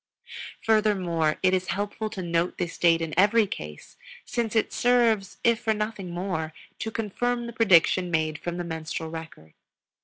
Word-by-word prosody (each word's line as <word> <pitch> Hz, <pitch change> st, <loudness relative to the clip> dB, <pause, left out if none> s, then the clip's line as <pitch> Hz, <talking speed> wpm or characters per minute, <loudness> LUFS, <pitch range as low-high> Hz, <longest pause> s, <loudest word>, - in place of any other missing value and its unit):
Furthermore, 185 Hz, -8 st, +2 dB
it 185 Hz, 0 st, +4 dB
is 185 Hz, -1 st, 0 dB
helpful 205 Hz, +4 st, -3 dB
to 195 Hz, -4 st, -6 dB
note 170 Hz, +1 st, 0 dB
this 170 Hz, -1 st, -3 dB
date 165 Hz, -1 st, +4 dB
in 160 Hz, -2 st, -4 dB
every 210 Hz, +3 st, +5 dB
case, 75 Hz, -, -8 dB, 0.3 s
since 235 Hz, -2 st, -2 dB
it 220 Hz, -, +1 dB
serves, 230 Hz, -5 st, +2 dB
if 235 Hz, -1 st, +3 dB
for 220 Hz, -1 st, 0 dB
nothing 210 Hz, -3 st, -4 dB
more, 170 Hz, -3 st, -3 dB, 0.3 s
to 220 Hz, -, -3 dB
confirm 240 Hz, +3 st, -2 dB
the 235 Hz, -, -7 dB
prediction 185 Hz, -5 st, +4 dB
made 155 Hz, -2 st, 0 dB
from 175 Hz, 0 st, -4 dB
the 175 Hz, -, -3 dB
menstrual 160 Hz, -1 st, -5 dB
record. 160 Hz, -, -9 dB
185 Hz, 160 wpm, -26 LUFS, 165-220 Hz, 0.3 s, every